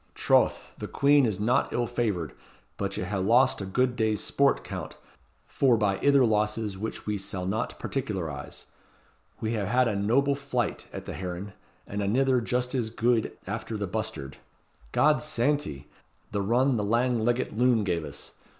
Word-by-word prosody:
Troth! - - +2
the - - -4
quean 140 -2 +4
is 105 -3 -2
not 115 +5 +2
ill 120 - 0
favoured; 105 - -2 0.4
but 100 -1 -3
ye - - -2
ha' 95 +2 -2
lost 125 +5 +4
a 95 - -4
gude 125 +5 +1
day's 110 -3 +1
sport, - - +2
Count, - - -6 0.5
forbye 105 -7 +2
ither 140 -2 +5
losses 105 -1 0
which 110 +4 -5
we 105 -1 -1
sall 95 -1 -4
na 110 +6 0
particularize. 95 - -5 0.8
We 110 - -1
hae 105 -4 -1
had 125 +4 +3
a 110 - 0
noble 120 +8 +2
flight 130 -5 -2
at - - -7
the - - -5
heron, 95 +2 -5 0.3
and 105 0 -4
anither 125 +5 +2
just 125 +2 -1
as 120 -4 0
guid 115 0 0
after 110 +2 -4
the 105 - -2
bustard. 105 -9 -4 0.5
God's 150 0 +3
santy! 140 - -1 0.4
the 100 - -1
run 120 +5 +2
the 105 - 0
lang 120 +2 +1
leggit 120 0 0
loon 120 -1 +3
gave 85 -4 -1
us. 70 -1 -8
110 Hz, 165 wpm, -27 LUFS, 100-125 Hz, 0.8 s, ither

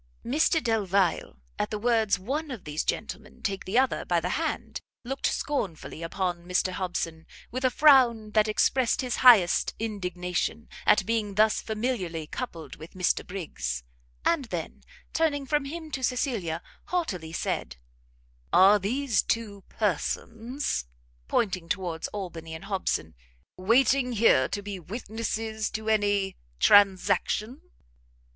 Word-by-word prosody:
Mr 310 +5 +2
Delvile, 200 - +1 0.2
at - - 0
the 215 - -3
words 220 -2 +2
one 280 +11 -3
of 240 -8 -7
these 150 +1 -3
gentlemen - - -4
take 195 -1 -2
the 195 +5 0
other 260 0 +2
by - - +1
the - - -3
hand, - - -3 0.2
looked 270 +3 -1
scornfully 195 - -3
upon 175 +1 -2
Mr 180 +1 0
Hobson, 175 -3 -3 0.2
with 255 +3 -4
a 255 - +5
frown 245 -6 +5
that 215 0 +3
expressed 235 +3 +2
his 250 -2 -2
highest 220 -9 +6
indignation, 185 0 -3 0.2
at 210 -2 +5
being 215 -2 -1
thus 215 +1 +3
familiarly 210 -8 -2
coupled 165 -2 -6
with 160 +2 -11
Mr 180 -1 +1
Briggs. 65 - -4 0.4
And 330 -5 +2
then, - - -5 0.3
turning 295 -4 +1
from 295 0 0
him 315 +2 -7
to 265 -2 -4
Cecilia, 225 - -1 0.2
haughtily 190 - -2
said, 65 - -3 0.8
"Are 195 +3 +7
these 235 +4 +1
two 210 -4 -3
persons," 225 - -2 0.4
pointing 185 -6 0
towards 175 -4 -2
Albany 170 -5 -6
and 160 +4 -9
Hobson, 185 - -2 0.4
"waiting 250 +5 +3
here 205 - +4
to 205 - -4
be 200 -1 -5
witnesses 220 +3 -3
to 220 0 -4
any 205 -3 +1 0.2
transaction?" 205 - +3
210 Hz, 130 wpm, -27 LUFS, 180-245 Hz, 0.8 s, Are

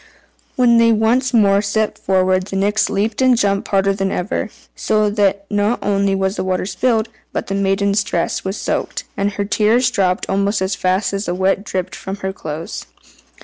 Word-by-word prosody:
When 240 -2 +4
they 230 0 +5
once 230 +4 +2
more 200 -4 +4
set 215 +1 -1
forward 185 0 +1
the 195 - -6
Nix 205 +3 +1
leaped 210 +4 -1
and 255 -2 +4
jumped 200 -3 0
harder 195 0 +2
than 195 0 -1
ever, 185 +3 -2 0.3
so 215 -1 +1
that 200 -1 +1
not 205 +3 +1
only 200 -1 +1
was 190 +1 -1
the - - -1
water 185 -1 -1
spilled, 225 +2 0 0.2
but - - -3
the 195 - -4
maiden's 200 +1 +1
dress 170 -3 -2
was 190 +2 -3
soaked, - - -3
and 200 0 -1
her 200 +1 -2
tears 225 +4 +2
dropped 185 -4 0
almost 200 +2 0
as 190 +1 -1
fast 185 +3 0
as 200 +1 -2
the 175 - -1
wet 190 +1 +1
dripped 185 -2 -4
from 190 - -6
her 190 - -2
clothes. 160 -1 -6
200 Hz, 190 wpm, -18 LUFS, 190-215 Hz, 0.3 s, they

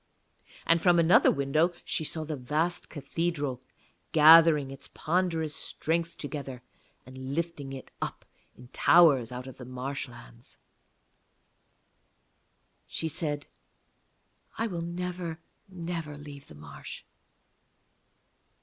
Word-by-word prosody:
And 165 0 +4
from 175 -1 +5
another 175 +9 +6
window 155 +5 +2
she 160 - -1
saw 155 +1 -3
the 155 0 -4
vast 155 +7 -1
cathedral 145 -3 -3 0.5
gathering 155 -2 +7
its 135 - -9
ponderous 165 -2 0
strength 170 +1 -2
together, 140 -4 -6 0.4
and 130 +1 -7
lifting 165 -5 -3
it 135 -1 -9
up - - -4 0.3
in 125 0 -14
towers 140 -7 +5
out 125 +1 -6
of 130 - -10
the 125 - -9
marshlands. 125 - -7 2.3
She 160 - -3
said, 145 -2 -3 1.1
'I 225 - 0
will 175 -7 -3
never, 175 -1 -4 0.3
never 165 -4 -5
leave 145 -1 -11
the 75 - -13
marsh.' 75 -1 -10
150 Hz, 105 wpm, -29 LUFS, 135-170 Hz, 2.3 s, gathering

